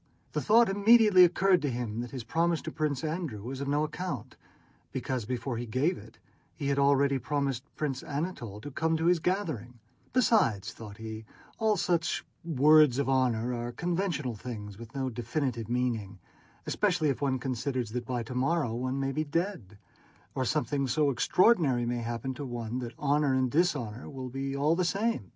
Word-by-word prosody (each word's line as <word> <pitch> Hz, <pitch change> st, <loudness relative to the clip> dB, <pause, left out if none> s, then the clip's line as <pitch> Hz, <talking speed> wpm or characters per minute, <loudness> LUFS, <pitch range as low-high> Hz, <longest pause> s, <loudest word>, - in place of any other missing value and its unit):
The -, -, -1 dB
thought 230 Hz, +2 st, +5 dB
immediately 205 Hz, -1 st, +6 dB
occurred 180 Hz, +1 st, +4 dB
to 145 Hz, -, 0 dB
him 120 Hz, -3 st, -3 dB
that 120 Hz, 0 st, -4 dB
his 130 Hz, -2 st, -6 dB
promise 165 Hz, +6 st, +1 dB
to -, -, -5 dB
Prince 150 Hz, -3 st, -1 dB
Andrew 155 Hz, -, -3 dB
was 130 Hz, +3 st, -5 dB
of 140 Hz, -, -3 dB
no 145 Hz, +2 st, +1 dB
account, 150 Hz, -, -5 dB, 0.6 s
because 125 Hz, -4 st, -3 dB
before 120 Hz, +1 st, -3 dB
he 120 Hz, +1 st, -4 dB
gave 135 Hz, +11 st, +1 dB
it -, -, -13 dB, 0.4 s
he 140 Hz, -3 st, -2 dB
had 140 Hz, 0 st, +1 dB
already 140 Hz, -1 st, +3 dB
promised 140 Hz, -3 st, -1 dB
Prince 145 Hz, -4 st, -2 dB
Anatole 140 Hz, -, -4 dB
to 145 Hz, -, -7 dB
come 160 Hz, +4 st, 0 dB
to 160 Hz, -, -1 dB
his 175 Hz, 0 st, +4 dB
gathering; 155 Hz, -, -2 dB, 0.3 s
"besides," 115 Hz, -, +2 dB
thought 105 Hz, -3 st, -10 dB
he, 110 Hz, 0 st, -7 dB, 0.3 s
"all 220 Hz, -2 st, +2 dB
such 170 Hz, -2 st, 0 dB, 0.2 s
'words 155 Hz, -3 st, +5 dB
of 140 Hz, -, 0 dB
honor' 125 Hz, -2 st, +1 dB
are 120 Hz, 0 st, -3 dB
conventional 170 Hz, -3 st, -1 dB
things 105 Hz, -2 st, -7 dB
with 115 Hz, +1 st, -11 dB
no 130 Hz, -1 st, -1 dB
definite 120 Hz, -1 st, -2 dB
meaning, 115 Hz, -5 st, -1 dB, 0.5 s
especially 180 Hz, -7 st, +1 dB
if 135 Hz, -, -2 dB
one 135 Hz, -2 st, +1 dB
considers 125 Hz, -2 st, -2 dB
that 120 Hz, 0 st, -4 dB
by 125 Hz, -2 st, -2 dB
tomorrow 130 Hz, +2 st, 0 dB
one 130 Hz, +3 st, -2 dB
may 135 Hz, 0 st, 0 dB
be 155 Hz, +3 st, -1 dB
dead, 155 Hz, -, -3 dB, 0.6 s
or 130 Hz, -, -1 dB
something 145 Hz, 0 st, 0 dB
so 145 Hz, +2 st, +2 dB
extraordinary 140 Hz, -, +3 dB
may 120 Hz, 0 st, -1 dB
happen 120 Hz, +2 st, -3 dB
to 145 Hz, -, -7 dB
one 120 Hz, -2 st, -4 dB
that 120 Hz, -1 st, -6 dB
honor 145 Hz, -1 st, +2 dB
and 130 Hz, -1 st, +1 dB
dishonor 140 Hz, -9 st, 0 dB
will 130 Hz, -2 st, -6 dB
be 135 Hz, +2 st, -3 dB
all 150 Hz, +4 st, +2 dB
the 180 Hz, -, +1 dB
same!" 195 Hz, -, -1 dB
135 Hz, 175 wpm, -29 LUFS, 120-160 Hz, 0.6 s, immediately